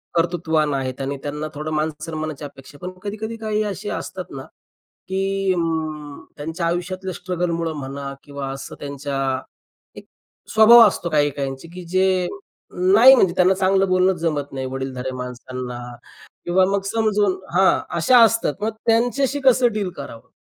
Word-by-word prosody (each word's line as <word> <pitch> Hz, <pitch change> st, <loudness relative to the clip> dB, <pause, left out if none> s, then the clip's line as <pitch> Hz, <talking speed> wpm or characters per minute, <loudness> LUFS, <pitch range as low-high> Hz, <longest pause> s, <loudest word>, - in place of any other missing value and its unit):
कर्तृत्वान 165 Hz, -3 st, +1 dB
आहेत 135 Hz, -1 st, -3 dB
आणि 140 Hz, +1 st, -3 dB
त्यांना 150 Hz, +1 st, -4 dB
थोडं 155 Hz, +1 st, -5 dB
मान-सन्मानाची 155 Hz, 0 st, -3 dB
अपेक्षा 140 Hz, 0 st, -12 dB
आहे. 180 Hz, -, -5 dB
पण 185 Hz, -, -20 dB
कधी-कधी 215 Hz, +2 st, -4 dB
काही 215 Hz, -1 st, -1 dB
असे 205 Hz, 0 st, -4 dB
असतात 185 Hz, -1 st, -6 dB
ना, 135 Hz, -, -6 dB, 0.6 s
की 195 Hz, 0 st, 0 dB
अं, 155 Hz, -4 st, -3 dB
त्यांच्या 160 Hz, +4 st, -4 dB
आयुष्यातल्या 185 Hz, +2 st, -3 dB
स्ट्रगल 180 Hz, 0 st, -3 dB
मुळं 165 Hz, -1 st, -2 dB
म्हणा 140 Hz, 0 st, -6 dB
किंवा 140 Hz, -1 st, -6 dB
असं 135 Hz, -, -7 dB
त्यांच्या 140 Hz, 0 st, -5 dB, 0.8 s
एक -, -, -10 dB, 0.5 s
स्वभाव 225 Hz, +1 st, +9 dB
असतो 180 Hz, -3 st, -2 dB
काही-काहींचे, 145 Hz, -1 st, -1 dB
की 180 Hz, 0 st, -8 dB
जे, 185 Hz, +1 st, +2 dB, 0.5 s
नाही 205 Hz, +9 st, +7 dB
म्हणजे 190 Hz, -8 st, +3 dB
त्यांना 185 Hz, +1 st, +4 dB
चांगलं 190 Hz, 0 st, +2 dB
बोलणं 185 Hz, +1 st, +3 dB
जमत 150 Hz, -4 st, -2 dB
नाही. 130 Hz, -1 st, -3 dB
वडीलधाऱ्या 130 Hz, -1 st, -4 dB
माणसांना 125 Hz, 0 st, -6 dB, 0.7 s
किंवा 185 Hz, +2 st, +3 dB
मग 200 Hz, 0 st, +1 dB
समजून 210 Hz, -2 st, +1 dB, 0.2 s
हां, 190 Hz, +1 st, +4 dB, 0.2 s
अशा 245 Hz, +9 st, +5 dB
असतात 225 Hz, -8 st, +2 dB
मग 215 Hz, -, +1 dB, 0.2 s
त्यांच्याशी 245 Hz, +5 st, +2 dB
कसं 255 Hz, -1 st, +5 dB
डील 205 Hz, -3 st, -2 dB
करावं? 140 Hz, -5 st, -9 dB
170 Hz, 145 wpm, -21 LUFS, 145-195 Hz, 0.8 s, स्वभाव